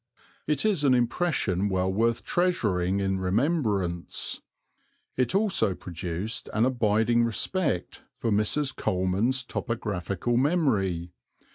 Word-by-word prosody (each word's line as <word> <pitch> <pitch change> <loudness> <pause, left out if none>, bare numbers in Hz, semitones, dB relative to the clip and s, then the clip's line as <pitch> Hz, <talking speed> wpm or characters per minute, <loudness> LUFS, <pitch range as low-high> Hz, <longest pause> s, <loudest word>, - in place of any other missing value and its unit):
It 150 +4 +1
is 195 -9 +2
an 135 -3 +5
impression 120 - +1
well 95 0 0
worth 115 +3 +1
treasuring 100 - +1
in 95 -1 0
remembrance. 100 - -1 0.7
It 130 +8 0
also 195 - +2
produced 90 +5 -5
an 110 +2 +4
abiding 120 -1 +2
respect 125 - -1 0.2
for 115 - -1
Mrs. 110 +7 +1
Coleman's 95 +8 0
topographical 110 -2 -2
memory. 110 - +1
110 Hz, 105 wpm, -27 LUFS, 95-130 Hz, 0.7 s, an